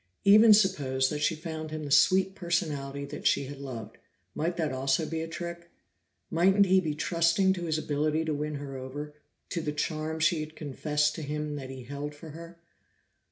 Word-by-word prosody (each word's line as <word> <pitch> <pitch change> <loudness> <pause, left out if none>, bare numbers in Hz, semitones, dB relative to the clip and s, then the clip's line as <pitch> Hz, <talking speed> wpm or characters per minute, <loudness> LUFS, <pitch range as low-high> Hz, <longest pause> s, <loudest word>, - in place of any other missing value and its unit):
Even 215 +3 +8
suppose 145 -11 +3
that 150 -1 -3
she 165 - +2
found 155 -1 -6
him 155 0 -5
the 145 - -6
sweet 185 +7 +5
personality 150 -7 -2
that 140 +1 -3
she 140 - +2
had 140 +1 -8
loved, 115 -5 -7 0.3
might 170 +2 -2
that 155 -4 0
also 135 +4 +1
be 160 0 -3
a 165 - -4
trick? 170 +1 -7 0.6
Mightn't 195 +4 +4
he 190 0 +5
be 155 -4 -2
trusting 170 +4 +2
to 175 -2 -5
his 160 -2 0
ability 155 +1 0
to 155 - -1
win 150 +1 -3
her 140 -1 -6
over, 140 +3 -6 0.4
to 170 - -2
the 150 -2 -2
charm 155 +1 -2
she 160 +1 +3
had 155 +1 -6
confessed 150 0 0
to - - -6
him 150 0 -3
that 135 -2 -7
he 130 -1 -8
held 145 +3 -6
for 155 +1 -10
her? 170 +2 -10
155 Hz, 195 wpm, -29 LUFS, 145-170 Hz, 0.6 s, Even